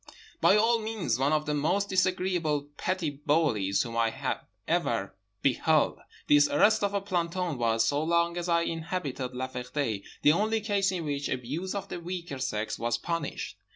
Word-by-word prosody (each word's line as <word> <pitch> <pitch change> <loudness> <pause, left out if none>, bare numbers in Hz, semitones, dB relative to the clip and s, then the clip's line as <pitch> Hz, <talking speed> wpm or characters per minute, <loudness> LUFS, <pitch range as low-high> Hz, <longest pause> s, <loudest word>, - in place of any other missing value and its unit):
By - - +6
all 230 +2 +3
means 215 - -2
one 140 +2 +2
of 155 0 +1
the 150 - -1
most 160 +8 +1
disagreeable 180 -6 0
petty 180 -3 -1
bullies 140 -9 +1
whom 115 -2 -7
I 115 -1 0 0.3
ever - - 0 0.3
beheld. - - +2 0.3
This 145 0 +6
arrest 210 +9 +4
of 200 0 0
a 200 - +1
planton 175 -5 -2
was, 115 -1 +2
so 145 +5 +1
long 170 +1 +2
as 175 0 -3
I 170 0 +3
inhabited 160 -7 -3
La 130 +1 -2
Ferté, 125 -4 -3 0.2
the 150 - +7
only 215 +6 +1
case 200 -3 +1
in 175 -3 -3
which 145 -1 -2
abuse 145 +10 -3
of 200 0 -4
the - - -5
weaker 170 -5 -5
sex 110 -4 -2
was 120 +1 0
punished. 170 +7 -4
160 Hz, 170 wpm, -28 LUFS, 135-185 Hz, 0.3 s, the